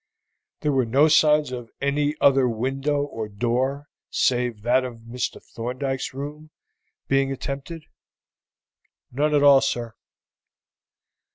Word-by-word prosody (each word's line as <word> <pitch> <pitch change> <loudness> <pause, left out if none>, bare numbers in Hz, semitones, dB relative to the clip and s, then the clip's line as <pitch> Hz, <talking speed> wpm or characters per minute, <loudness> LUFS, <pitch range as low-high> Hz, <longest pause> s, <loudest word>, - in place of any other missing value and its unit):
"There 150 - +1
were 130 -3 +1
no 140 +7 +4
signs 150 -2 +4
of 120 -2 -6
any 145 +2 0
other 135 -2 +4
window 135 +5 -1
or 115 -7 -5
door 125 +7 -1 0.2
save 120 -4 0
that 125 +2 +3
of 120 -3 -7
Mr. 120 +2 -4
Thorndyke's 130 +3 -3
room 150 +3 -7 0.6
being 135 0 +2
attempted?" 140 +4 -6 1.3
"None 150 +4 +1
at 145 - +3
all, 140 -2 +7
sir." 120 -4 -2
135 Hz, 115 wpm, -24 LUFS, 120-145 Hz, 1.3 s, all